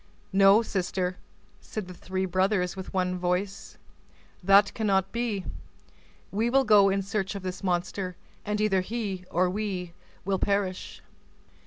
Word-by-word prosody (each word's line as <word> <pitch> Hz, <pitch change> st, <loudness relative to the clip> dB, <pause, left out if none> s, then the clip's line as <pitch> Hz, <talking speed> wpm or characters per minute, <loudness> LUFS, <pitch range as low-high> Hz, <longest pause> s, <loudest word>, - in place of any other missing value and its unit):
"No, 195 Hz, +3 st, +6 dB
sister," 185 Hz, -2 st, -2 dB, 0.4 s
said 215 Hz, -4 st, -6 dB
the 180 Hz, -, -8 dB
three 185 Hz, +1 st, -3 dB
brothers 185 Hz, 0 st, +1 dB
with 190 Hz, -1 st, -7 dB
one 180 Hz, -1 st, -1 dB
voice, 180 Hz, +2 st, -2 dB, 0.7 s
"that 200 Hz, +2 st, +5 dB
cannot 195 Hz, -3 st, +1 dB
be; 230 Hz, -5 st, -2 dB, 0.9 s
we 220 Hz, +4 st, +1 dB
will 270 Hz, +2 st, +4 dB
go 210 Hz, -5 st, +6 dB
in 195 Hz, 0 st, 0 dB
search 195 Hz, 0 st, -2 dB
of 200 Hz, -, -6 dB
this 185 Hz, +1 st, -5 dB
monster, 180 Hz, 0 st, -1 dB, 0.3 s
and 210 Hz, 0 st, -2 dB
either 205 Hz, -3 st, +2 dB
he 200 Hz, -3 st, -4 dB
or 180 Hz, +2 st, +2 dB
we 185 Hz, -3 st, -3 dB, 0.3 s
will 195 Hz, -1 st, 0 dB
perish." 200 Hz, -2 st, -2 dB
195 Hz, 140 wpm, -27 LUFS, 185-205 Hz, 0.9 s, No